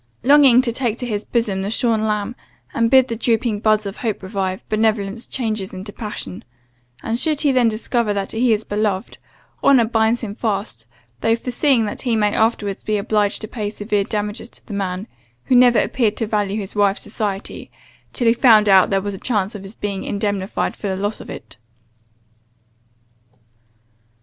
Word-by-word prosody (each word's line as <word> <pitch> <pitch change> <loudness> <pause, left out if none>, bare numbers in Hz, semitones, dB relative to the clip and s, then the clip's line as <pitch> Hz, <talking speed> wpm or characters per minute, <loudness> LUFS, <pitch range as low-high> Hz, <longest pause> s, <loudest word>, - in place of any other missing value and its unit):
Longing 270 -2 +6
to 240 - 0
take 235 -2 -1
to 250 - -4
his 210 -3 -3
bosom 220 -5 -1
the 195 - -3
shorn 225 -1 +1
lamb, 210 +2 -2 0.4
and 230 0 +2
bid 260 0 +5
the 230 - -3
drooping 225 -1 0
buds 215 0 +2
of 200 0 -6
hope 220 -5 -3
revive, 190 -1 -3
benevolence 215 0 0
changes 215 -6 -3
into 190 +2 -8
passion: 210 - -6 0.6
and 230 +1 -1
should 300 +1 0
he 290 - +3
then 250 -3 +3
discover 225 0 0
that 200 -1 -2
he 235 +2 +2
is 215 0 +1
beloved, 205 -1 -2 0.4
honour 260 -4 +5
binds 225 +1 +1
him 215 -4 -5
fast, 205 - -3 0.3
though 225 - +2
foreseeing 250 0 +1
that 205 - -4
he 240 -3 0
may 210 -1 +1
afterwards 220 -3 0
be 215 -1 0
obliged 205 0 0
to 215 - -5
pay 210 -2 -4
severe 205 -1 -1
damages 210 +2 -3
to - - -15
the 210 - -8
man, 195 0 -3 0.4
who 255 - +2
never 245 -1 +6
appeared 220 -3 +1
to 225 - -1
value 210 -1 -1
his 200 -1 -5
wife's 200 -1 +2
society, 205 -2 -4 0.4
till 240 - -2
he 230 - +5
found 225 -3 +5
that 190 -2 +5
there 195 -1 +1
was 205 +1 -4
a 190 - -7
chance 210 -4 -1
of 205 - -7
his 195 +3 -9
being 200 -2 -4
indemnified 200 -1 -2
for 205 - -5
the 190 -1 -2
loss 205 +2 -3
of - - -11
it. 110 - -9
215 Hz, 185 wpm, -20 LUFS, 200-235 Hz, 0.6 s, Longing